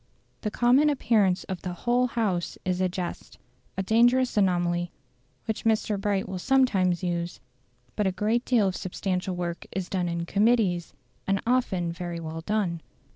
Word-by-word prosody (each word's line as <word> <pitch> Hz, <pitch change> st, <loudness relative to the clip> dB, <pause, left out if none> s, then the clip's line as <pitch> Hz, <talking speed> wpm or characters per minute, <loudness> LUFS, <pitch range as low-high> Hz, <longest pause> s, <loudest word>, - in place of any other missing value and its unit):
The 210 Hz, -, -1 dB
common 250 Hz, +7 st, +4 dB
appearance 215 Hz, -9 st, +2 dB
of 190 Hz, -2 st, -6 dB
the 180 Hz, -, -4 dB
"whole 245 Hz, +7 st, +1 dB
House" 210 Hz, -8 st, -1 dB
is 185 Hz, 0 st, 0 dB
a 185 Hz, -, +2 dB
jest 180 Hz, -1 st, -6 dB, 0.4 s
a 195 Hz, -, 0 dB
dangerous 245 Hz, +5 st, +3 dB
anomaly, 175 Hz, -3 st, +1 dB, 0.5 s
which 220 Hz, -, -3 dB
Mr. 215 Hz, -2 st, +1 dB
Bright 200 Hz, -1 st, 0 dB
will 185 Hz, -, -4 dB
sometimes 190 Hz, -, +2 dB
use; 175 Hz, -1 st, -2 dB, 0.6 s
but 210 Hz, -, +1 dB
a -, -, +2 dB
great 215 Hz, +5 st, 0 dB
deal 230 Hz, -7 st, +3 dB
of 185 Hz, -, -2 dB
substantial 185 Hz, 0 st, -2 dB
work 175 Hz, -1 st, -4 dB
is 190 Hz, -1 st, -4 dB
done 180 Hz, -2 st, -1 dB
in 170 Hz, 0 st, -2 dB
"Committees," 200 Hz, -3 st, +1 dB, 0.3 s
and 195 Hz, 0 st, +2 dB
often 220 Hz, -9 st, +1 dB
very 170 Hz, -1 st, -5 dB
well 160 Hz, 0 st, -6 dB
done. 180 Hz, -3 st, -1 dB
190 Hz, 160 wpm, -26 LUFS, 175-225 Hz, 0.6 s, common